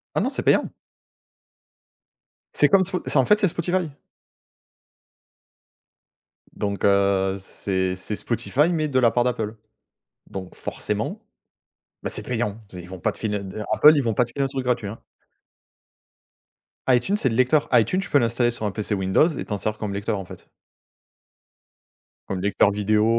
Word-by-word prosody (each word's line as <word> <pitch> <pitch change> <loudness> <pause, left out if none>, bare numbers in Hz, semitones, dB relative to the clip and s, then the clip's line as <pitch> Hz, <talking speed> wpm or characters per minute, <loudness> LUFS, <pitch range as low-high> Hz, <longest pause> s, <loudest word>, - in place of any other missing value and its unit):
Ah - - +2
non, - - +1
c'est - - -3
payant. - - +2 1.8
C'est 145 - +5
comme 195 -1 +5
spo 185 0 -3
c'est - - +1
en 130 - +4
fait 210 0 +4
c'est 200 - +3
Spotify. 175 0 -1 2.6
Donc 100 -1 -4
heu, 100 -1 +2
c'est 95 -1 -2
c'est 105 +3 -4
Spotify, 145 +9 0
mais 155 -2 0
de 130 -2 +1
la 120 -2 +5
part 120 - +2
d'Apple, 115 -3 -2 0.7
donc 95 -2 -7
forcément, - - -4 0.8
bah, - - -3
c'est - - -1
payant. 115 -3 -3
Ils 90 -1 -9
vont 95 -2 -9
pas - - +1
te - - -15
filer 105 -2 -2
d 100 +2 -6
Apple, 150 +1 +7
ils 140 - +2
vont 115 -3 0
pas 125 - +3
de - - -12
filer 140 +2 -1
un - - +1
truc 135 -1 -4
gratuit, 120 -4 0
hein. 110 - -8 1.9
Itunes, 130 - +3
c'est 135 - +1
le 110 - -2
lecteur. 130 +4 +2
Itunes 125 - +3
tu - - -8
peux 145 - +4
l'installer 120 +1 +1
sur 110 -2 -4
un 100 - -1
PC 105 0 -3
Windows 95 - +3
et 160 - -4
t'en 105 - -3
sers 110 +2 -2
comme 105 -2 -4
lecteur 100 +1 -2
en 95 - -7
fait. - - -13 1.8
Comme 95 -2 -2
lecteur 100 +1 +3
vidéo, 105 +1 +1
115 Hz, 170 wpm, -23 LUFS, 100-135 Hz, 2.6 s, Apple